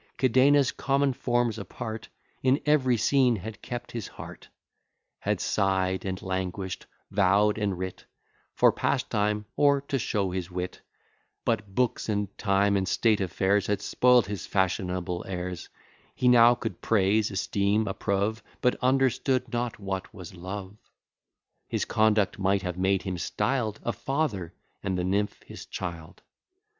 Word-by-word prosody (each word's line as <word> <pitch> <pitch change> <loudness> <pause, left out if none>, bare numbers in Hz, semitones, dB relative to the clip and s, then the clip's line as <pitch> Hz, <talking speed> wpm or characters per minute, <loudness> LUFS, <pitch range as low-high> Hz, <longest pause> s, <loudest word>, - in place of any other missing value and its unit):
Cadenus, 130 +2 +4
common 140 0 +1
forms 120 -2 0
apart, 110 +2 -6 0.3
In 130 +2 +3
every 135 -5 +3
scene 125 +1 +3
had 105 +1 -7
kept 120 0 -6
his 115 -4 -5
heart; - - -11 0.7
Had - - -1
sigh'd 95 -1 0
and 95 -1 -3
languish'd, 95 0 -3 0.2
vow'd 105 +2 +3
and 100 -3 -1
writ, 95 0 -6 0.5
For - - +5
pastime, 105 0 0
or 140 -1 +4
to 140 -1 -2
show 100 -5 -1
his 90 -1 -3
wit, 90 0 -5 0.6
But 105 -4 -1
books, 125 -2 0
and 100 -2 -1
time, 100 -1 +2
and 95 -1 -1
state 110 0 +2
affairs, 95 +2 +1
Had 105 -1 0
spoil'd 125 -2 +4
his 100 -1 -5
fashionable 90 -2 -1
airs: 90 -2 -5 0.5
He 125 - +1
now 120 0 +7
could 115 -1 -5
praise, 105 0 +2
esteem, 100 +2 0
approve, 100 +3 -1 0.2
But 125 - +2
understood 130 -1 +1
not 120 -1 -2
what 95 -2 -4
was 95 -6 -10
love. 95 +3 -7 0.9
His - - -1
conduct 110 -2 +2
might 95 0 +1
have 90 -2 -3
made 95 +1 +1
him 95 -2 -3
styled 110 +3 -1
A 120 - -1
father, 120 - -2 0.3
and 95 -2 -2
the 90 - -1
nymph 100 +3 -1
his - - -10
child. 85 -3 -7
105 Hz, 140 wpm, -27 LUFS, 95-120 Hz, 0.9 s, now